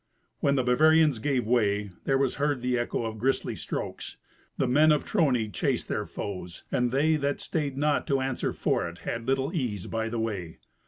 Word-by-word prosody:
When 140 - +2
the 130 - +2
Bavarians 150 +1 +4
gave 130 0 0
way, 105 -4 +1
there 135 - +3
was 135 -2 0
heard 145 -3 0
the 125 0 +1
echo 120 -1 -1
of 110 -1 -5
grisly 135 +4 0
strokes. - - -5 0.4
The 130 - +1
men 150 +5 +5
of 150 - +2
Trony 125 - +1
chased - - -1
their - - -2
foes, 90 -3 -6
and 125 -1 +1
they 155 +4 +3
that 140 -1 -1
stayed 145 -4 -2
not 150 0 +1
to 135 -1 +2
answer 130 -1 -1
for - - 0
it - - -12
had 115 +1 -3
little 135 +3 0
ease 115 - -2
by 115 0 -2
the 115 - -3
way. 100 -7 -3
130 Hz, 195 wpm, -27 LUFS, 115-145 Hz, 0.4 s, men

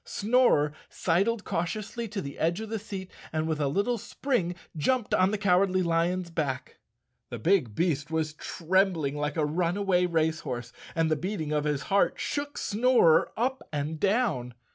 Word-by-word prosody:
Snorer 205 - +2 0.2
sidled 200 +6 +1
cautiously 215 +7 -3
to 205 -1 -4
the 140 - -7
edge 170 +4 +1
of 220 -1 -6
the 225 0 -2
seat 195 -3 -7 0.2
and 155 0 -1
with 160 -2 -1
a 145 - +1
little 205 - 0
spring 200 -8 -1 0.2
jumped 230 - 0
on 185 +1 +4
the 215 - -1
Cowardly 185 -1 +3
Lion's 170 +1 0
back. 145 -6 -3 0.5
The - - -5
big 165 - +2
beast 155 -4 0
was 160 -1 -1
trembling 170 -3 0
like 150 0 -2
a 155 - +2
runaway 180 +3 +1
race 160 -1 +1
horse, 120 -5 -5 0.2
and 165 -1 +1
the - - +4
beating 165 -1 -3
of 150 0 0
his 145 -1 0
heart 200 +1 +2
shook 290 0 -3
Snorer 225 -7 +4
up 260 +3 0
and 150 +1 -3
down. 195 - +1
175 Hz, 165 wpm, -28 LUFS, 155-205 Hz, 0.5 s, on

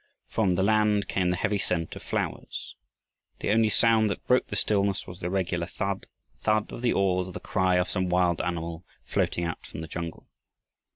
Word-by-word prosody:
From 100 -5 +1
the 95 - +2
land 105 0 +3
came 90 -2 +1
the 90 - +2
heavy 100 +3 0
scent 85 -3 -1
of - - -8
flowers. - - -4 0.6
The - - 0
only 110 0 +4
sound 110 0 +4
that 100 - -4
broke 125 0 +3
the - - -4
stillness 100 -2 +1
was 90 -1 -9
the 90 - -2
regular 90 -2 -1
thud, 100 0 -3 0.3
thud 110 0 +1
of - - -7
the 125 - +2
oars 90 -2 +2
or 95 - -8
the - - -5
cry 95 -2 +1
of 90 0 +2
some 95 -2 -1
wild 90 -2 +2
animal 85 -1 -3 0.2
floating 85 - 0
out 85 -1 -3
from 80 - -8
the 80 - -6
jungle. 85 0 -6
95 Hz, 195 wpm, -27 LUFS, 90-105 Hz, 0.6 s, only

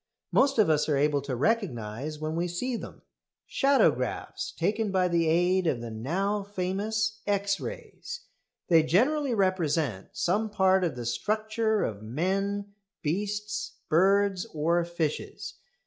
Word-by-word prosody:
Most 275 -1 +3
of 215 - +5
us 155 -1 +2
are 145 - +2
able 145 0 +2
to 135 -2 -3
recognise 140 - -1
when 155 +1 -3
we 170 +1 0
see 235 +9 -2
them - - -8 0.4
shadowgraphs 275 0 +1
taken 210 +5 0
by 185 -1 +2
the 170 -2 +1
aid 175 +2 +2
of 130 - +1
the 115 -1 -6
now 185 - -1
famous 205 +3 -2
X 200 -1 +1
rays. 480 +1 -7 0.5
They 165 -2 +6
generally 255 - +2
represent 160 - 0
some 205 +5 0
part 190 -2 +3
of 165 -7 -1
the 120 -1 -6
structure 215 - 0
of 105 -2 -3
men, 195 - -2 0.3
beasts, 205 +6 -2 0.2
birds, 195 +2 +3
or 170 +3 +2
fishes. 170 -3 -4
185 Hz, 135 wpm, -28 LUFS, 155-210 Hz, 0.5 s, They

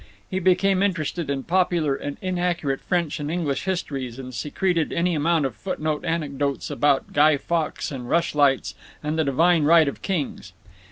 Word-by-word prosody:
He 190 - 0
became 185 +1 +3
interested 175 -5 -1
in 135 -1 -2
popular 175 -5 +1
and 140 +1 -5
inaccurate 175 -6 -1
French 170 -3 -1
and 145 0 -3
English 160 -4 -2
histories, 135 -10 -3
and 130 -1 -8
secreted 165 - -1
any 175 +1 +1
amount 160 0 +2
of 130 -5 -3
footnote 150 +7 -3
anecdotes 145 -4 -2
about 145 -2 +1
Guy 150 0 +5
Fawkes 165 +1 -2
and 125 -3 -6
rush 170 0 +1
lights 135 -7 +2 0.3
and 155 +2 -1
the - - +4
divine 160 +5 +3
right 160 0 +6
of 140 - -4
kings. 145 - -3
155 Hz, 165 wpm, -24 LUFS, 140-175 Hz, 0.3 s, right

